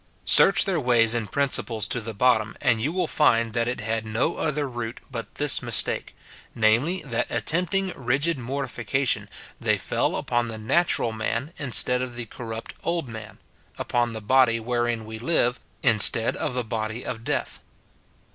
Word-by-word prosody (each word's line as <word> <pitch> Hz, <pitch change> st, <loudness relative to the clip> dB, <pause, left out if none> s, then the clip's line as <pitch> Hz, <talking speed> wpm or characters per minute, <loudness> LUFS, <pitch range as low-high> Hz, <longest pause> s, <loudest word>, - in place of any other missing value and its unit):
Search 195 Hz, 0 st, +7 dB
their 185 Hz, -4 st, -1 dB
ways 120 Hz, -4 st, +3 dB
and 115 Hz, -3 st, -2 dB
principles 120 Hz, -6 st, -1 dB
to 120 Hz, -, +1 dB
the 115 Hz, 0 st, -6 dB
bottom, 115 Hz, -1 st, +1 dB
and 115 Hz, -3 st, +1 dB
you 145 Hz, +7 st, -1 dB
will 180 Hz, 0 st, -1 dB
find 115 Hz, -8 st, +1 dB
that 115 Hz, 0 st, -1 dB
it 120 Hz, -2 st, -4 dB
had 110 Hz, 0 st, -3 dB
no 110 Hz, +9 st, -2 dB
other 150 Hz, -2 st, -2 dB
root 120 Hz, -2 st, -6 dB
but 115 Hz, -4 st, -7 dB
this 145 Hz, -2 st, +3 dB
mistake, 120 Hz, -3 st, 0 dB, 0.4 s
namely, 120 Hz, +11 st, +1 dB
that 120 Hz, -4 st, -2 dB
attempting 180 Hz, +3 st, -1 dB
rigid 140 Hz, +5 st, 0 dB
mortification, 130 Hz, 0 st, -2 dB, 0.3 s
they -, -, +1 dB
fell -, -, -1 dB
upon 120 Hz, 0 st, -1 dB
the 110 Hz, -1 st, -7 dB
natural 125 Hz, +2 st, 0 dB
man 115 Hz, +7 st, -4 dB
instead 125 Hz, -2 st, +5 dB
of 125 Hz, -1 st, -6 dB
the 120 Hz, -1 st, -5 dB
corrupt 115 Hz, 0 st, -8 dB
old 170 Hz, -4 st, -2 dB
man, 110 Hz, -3 st, -10 dB, 0.2 s
— -, -, -35 dB
upon 120 Hz, -1 st, -1 dB
the 110 Hz, -, -6 dB
body 120 Hz, 0 st, +3 dB
wherein 120 Hz, -1 st, -2 dB
we 110 Hz, 0 st, -8 dB
live, 125 Hz, -2 st, 0 dB, 0.2 s
instead 115 Hz, +1 st, +6 dB
of 125 Hz, -, -3 dB
the 125 Hz, -, -1 dB
body 110 Hz, +1 st, -5 dB
of 115 Hz, -2 st, -6 dB
death. -, -, -3 dB
120 Hz, 165 wpm, -24 LUFS, 115-135 Hz, 0.4 s, Search